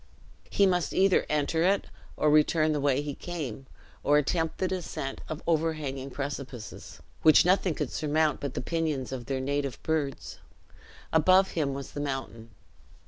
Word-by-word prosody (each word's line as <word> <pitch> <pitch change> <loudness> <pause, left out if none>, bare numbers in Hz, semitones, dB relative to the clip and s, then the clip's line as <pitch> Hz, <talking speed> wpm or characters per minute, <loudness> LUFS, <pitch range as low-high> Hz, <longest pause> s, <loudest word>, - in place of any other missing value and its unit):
He 200 - +3
must 180 -3 +1
either 190 0 +3
enter 150 +2 +1
it 195 +3 +2 0.3
or 150 - +3
return 155 +1 +4
the 150 - 0
way 140 0 +2
he 145 -1 -4
came, 135 -7 -6 0.4
or 145 +1 +4
attempt 160 +2 0
the 185 - 0
descent 175 -7 -4
of 155 +2 -5
overhanging 155 -5 -1
precipices, 135 -4 -7 0.2
which 155 +1 +6
nothing 180 -2 +2
could 150 -5 -3
surmount 155 0 +1
but 140 -2 -5
the - - -2
pinions 155 -3 -2
of 125 -3 -6
their 135 -1 -1
native 140 -1 -2
birds. 150 -4 -2 0.7
Above 185 +4 +5
him 140 -4 -1
was 140 -1 -7
the - - -6
mountain. 130 -5 -5
150 Hz, 155 wpm, -28 LUFS, 135-165 Hz, 0.7 s, which